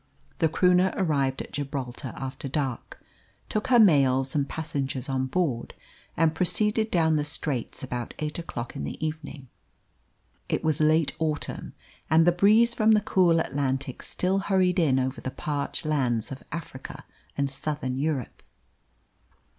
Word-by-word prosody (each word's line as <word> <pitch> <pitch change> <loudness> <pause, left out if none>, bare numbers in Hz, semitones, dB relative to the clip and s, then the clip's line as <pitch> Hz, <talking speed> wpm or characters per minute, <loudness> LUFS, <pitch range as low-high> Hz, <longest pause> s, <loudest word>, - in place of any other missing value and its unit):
The 160 - +3
Croonah 180 +3 +3
arrived 140 -7 0
at - - -15
Gibraltar 135 -2 -4
after 135 +1 -5
dark, 135 -3 -3 0.5
took 215 - -1
her 255 - +5
mails 135 - +4
and 140 -2 0
passengers 140 -4 -3
on 130 -1 -1
board, 135 -6 -1 0.4
and 160 -1 +3
proceeded 210 +5 +2
down 160 -4 +3
the 150 - +1
Straits 145 -5 -3
about 125 -2 -5
eight 150 +2 -3
o'clock 125 -8 -6
in - - -4
the 70 - -5
evening. 155 -3 -6 1.0
It - - -1
was 155 -1 +1
late 155 0 +3
autumn, 155 -2 -3 0.4
and 160 +1 +5
the 175 - +6
breeze 215 +6 +4
from 220 -1 +4
the 210 - +4
cool 180 -5 +3
Atlantic 135 -3 -2
still 190 +2 0
hurried 185 -2 +2
in 145 -6 +3
over 130 0 -1
the - - -3
parched 145 +3 -4
lands 125 -7 0
of 135 - -7
Africa 150 -5 -7 0.3
and 140 0 +1
Southern 135 -2 -3
Europe. 145 -4 -2
150 Hz, 145 wpm, -26 LUFS, 135-170 Hz, 1.0 s, the